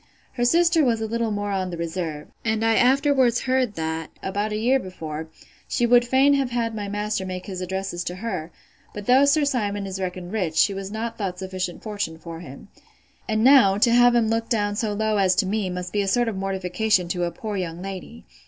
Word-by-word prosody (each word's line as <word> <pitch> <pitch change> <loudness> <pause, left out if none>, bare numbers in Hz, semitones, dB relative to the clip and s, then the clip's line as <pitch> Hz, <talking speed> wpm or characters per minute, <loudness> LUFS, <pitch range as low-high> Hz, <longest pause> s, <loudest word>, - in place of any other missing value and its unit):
Her 240 - 0
sister 335 +3 +4
was 235 -4 +2
a 220 - -2
little 230 +1 -1
more 205 -1 -2
on 190 -2 -1
the 170 - -6
reserve; 165 -3 -4 0.2
and 220 0 0
I 225 - +4
afterwards 260 -1 +3
heard, 255 -4 0
that, 160 0 -3
about 205 +3 -2
a 210 - -1
year 250 +5 +2
before, 160 -6 -6 0.4
she 240 - +1
would 240 0 +5
fain 270 +3 +4
have 275 -2 +1
had 235 -2 -1
my 205 -2 -4
master 210 -1 -2
make 185 -1 -5
his 185 -3 -6
addresses 190 -1 -3
to 180 - -4
her: 185 -6 -4 0.5
but 205 -1 -6
though 260 +4 +5
Sir 290 +1 +3
Simon 205 -7 -1
is 190 0 -5
reckoned 180 -1 -5
rich, 185 -8 -2
she 200 +5 +4
was 195 0 -5
not 230 +2 -5
thought 190 -3 -3
sufficient 185 -1 -5
fortune 205 -7 -4
for 165 0 -9
him. 140 +3 -11 0.6
And 215 0 +1
now, 245 -7 +6
to 230 +3 +4
have 245 0 +5
him 235 -2 +3
look 225 +1 -1
down 205 -3 0
so 215 0 -1
low 215 0 0
as 190 -1 +3
me, 200 0 -1
must 180 0 -5
be 205 - +1
a 200 - -2
sort 240 +4 +2
of 225 - -2
mortification 190 0 0
to 175 0 -1
a - - -1
poor 215 +2 -5
young 175 -3 -4
lady! 190 - -8
205 Hz, 220 wpm, -24 LUFS, 185-235 Hz, 0.6 s, now